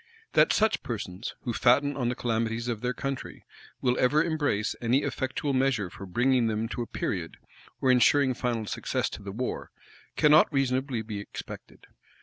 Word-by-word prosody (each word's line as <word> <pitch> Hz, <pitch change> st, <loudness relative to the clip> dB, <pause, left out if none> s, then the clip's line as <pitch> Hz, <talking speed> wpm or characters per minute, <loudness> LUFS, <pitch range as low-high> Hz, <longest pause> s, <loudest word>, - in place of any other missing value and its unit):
That -, -, +5 dB
such 220 Hz, 0 st, +2 dB
persons, 100 Hz, -3 st, -5 dB
who 120 Hz, -, -3 dB
fatten 140 Hz, +5 st, +3 dB
on 125 Hz, -3 st, 0 dB
the 125 Hz, -, -2 dB
calamities 115 Hz, 0 st, -1 dB
of 115 Hz, -3 st, -2 dB
their 125 Hz, 0 st, 0 dB
country, 135 Hz, +1 st, -5 dB, 0.4 s
will 125 Hz, -1 st, +1 dB
ever 150 Hz, +5 st, +4 dB
embrace 145 Hz, -10 st, 0 dB
any 120 Hz, +4 st, +2 dB
effectual 135 Hz, +2 st, -2 dB
measure 130 Hz, -8 st, +1 dB
for 100 Hz, -, -9 dB
bringing 120 Hz, +4 st, +2 dB
them 110 Hz, 0 st, -1 dB
to 120 Hz, -, -4 dB
a 120 Hz, -, -4 dB
period, 85 Hz, -4 st, -3 dB, 0.4 s
or 130 Hz, -, +3 dB
insuring 130 Hz, +2 st, +4 dB
final 120 Hz, -3 st, -2 dB
success -, -, -2 dB
to -, -, -7 dB
the 100 Hz, -1 st, -6 dB
war, 125 Hz, +5 st, -4 dB, 0.5 s
cannot 150 Hz, +2 st, +5 dB
reasonably 130 Hz, -3 st, 0 dB
be 105 Hz, -2 st, -5 dB
expected. 100 Hz, -, -9 dB
125 Hz, 165 wpm, -28 LUFS, 110-135 Hz, 0.5 s, That